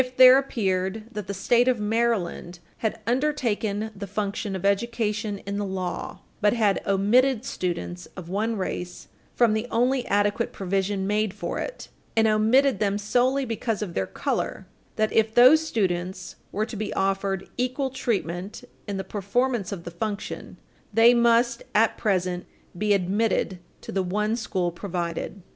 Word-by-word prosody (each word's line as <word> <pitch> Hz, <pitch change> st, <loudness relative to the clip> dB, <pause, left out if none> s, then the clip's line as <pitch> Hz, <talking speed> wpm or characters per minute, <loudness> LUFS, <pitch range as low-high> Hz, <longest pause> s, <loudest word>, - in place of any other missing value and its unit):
It 255 Hz, 0 st, -7 dB
there 255 Hz, +1 st, +9 dB
appeared 195 Hz, -5 st, -1 dB
that 210 Hz, -4 st, -6 dB
the 200 Hz, -, -3 dB
State 240 Hz, +5 st, +3 dB
of 250 Hz, -3 st, +2 dB
Maryland 210 Hz, -5 st, -1 dB, 0.2 s
had 220 Hz, 0 st, -2 dB
"undertaken 230 Hz, -5 st, 0 dB
the 200 Hz, 0 st, -6 dB
function 205 Hz, 0 st, -3 dB
of 190 Hz, -, -4 dB
education 215 Hz, 0 st, 0 dB
in 200 Hz, +1 st, -3 dB
the 205 Hz, -, -1 dB
law," 185 Hz, -3 st, -4 dB, 0.2 s
but 210 Hz, 0 st, +4 dB
had 215 Hz, -4 st, +2 dB
"omitted 230 Hz, +6 st, +3 dB
students 175 Hz, 0 st, -4 dB
of 180 Hz, -3 st, -7 dB
one 215 Hz, +5 st, -1 dB
race 180 Hz, -2 st, -5 dB, 0.3 s
from 235 Hz, -3 st, +4 dB
the 220 Hz, +2 st, -1 dB
only 250 Hz, +2 st, +2 dB
adequate 205 Hz, 0 st, +1 dB
provision 195 Hz, +1 st, -1 dB
made 210 Hz, 0 st, 0 dB
for 205 Hz, -, -4 dB
it, -, -, -6 dB, 0.3 s
and 225 Hz, 0 st, +5 dB
omitted 225 Hz, +3 st, +3 dB
them 205 Hz, -1 st, +1 dB
solely 250 Hz, +6 st, +1 dB
because 225 Hz, -2 st, -2 dB
of 180 Hz, -5 st, -6 dB
their 95 Hz, -, -1 dB
color"; -, -, -2 dB, 0.3 s
that, 215 Hz, 0 st, 0 dB
if 220 Hz, 0 st, +2 dB
those 255 Hz, +6 st, +8 dB
students 185 Hz, -, -2 dB, 0.2 s
were 215 Hz, +2 st, -1 dB
to 225 Hz, -, -8 dB
be 215 Hz, +1 st, -3 dB
offered 195 Hz, 0 st, 0 dB
"equal 255 Hz, +2 st, -1 dB
treatment 190 Hz, -, -3 dB, 0.2 s
in 200 Hz, -1 st, -3 dB
the 190 Hz, -, -3 dB
performance 210 Hz, +3 st, -1 dB
of 185 Hz, -4 st, -5 dB
the 170 Hz, -, -7 dB
function, 200 Hz, +4 st, -5 dB, 0.3 s
they 225 Hz, +3 st, +6 dB
must, 235 Hz, 0 st, +3 dB
at 225 Hz, +1 st, +4 dB
present, 180 Hz, -3 st, 0 dB, 0.3 s
be 205 Hz, +3 st, +2 dB
admitted 195 Hz, 0 st, 0 dB, 0.2 s
to -, -, -8 dB
the 190 Hz, -, 0 dB
one 210 Hz, +4 st, 0 dB
school 190 Hz, -7 st, -1 dB
provided." 170 Hz, -2 st, -4 dB
Id. 200 Hz, -, -15 dB
210 Hz, 160 wpm, -25 LUFS, 190-235 Hz, 0.3 s, there